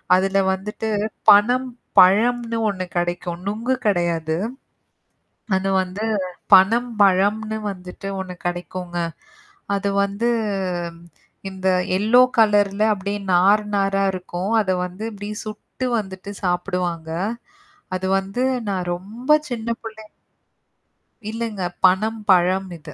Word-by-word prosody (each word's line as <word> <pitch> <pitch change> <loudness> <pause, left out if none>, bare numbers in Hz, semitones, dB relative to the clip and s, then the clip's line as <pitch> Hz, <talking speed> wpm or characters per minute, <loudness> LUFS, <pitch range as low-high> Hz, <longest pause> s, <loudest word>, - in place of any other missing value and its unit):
அதுல 195 +1 +2
வந்துட்டு 210 +3 -5 0.4
பனம் 245 +6 +5 0.3
பழம்னு 230 +5 +4
ஒண்ணு 185 -2 -3
கிடைக்கும். 175 0 -2
நுங்கு 230 +5 -1
கெடையாது. 170 -4 0 1.2
அது 195 +1 -1
வந்து 185 +4 -5 0.5
பனம் 230 +6 +5
பழம்னு 205 +3 +2
வந்துட்டு 185 +1 -8
ஒண்ணு 180 -1 -6
கெடைக்குங்க. 175 0 -5 0.8
அது 200 0 -1
வந்து 200 +4 -1 1.2
இந்த 190 0 -6 0.3
எல்லோ 225 +5 +5 0.2
கலர்ல 205 -2 +3
அப்படியே 200 +1 -4
நார் 200 +4 +4
நாரா 195 0 +1
இருக்கும். 180 +2 -4
அத 190 - -2 0.2
வந்து 185 +5 -8
அப்படியே, 205 +1 -6
சுட்டு 215 +4 -6
வந்துட்டு 190 0 -6
சாப்புடுவாங்க. 175 -2 -2 0.9
அது 190 +1 -3
வந்து 195 +6 -3 0.3
நான் 185 -2 -2
ரொம்ப 215 +8 -11 0.2
சின்ன 235 -1 -4
புள்ளை 220 -1 -9 1.3
இல்லங்க. 225 -4 -4 0.2
பனம் 215 +4 +2
பழம் 185 +1 +4
இது. 150 -1 -12
195 Hz, 105 wpm, -21 LUFS, 185-215 Hz, 1.3 s, பனம்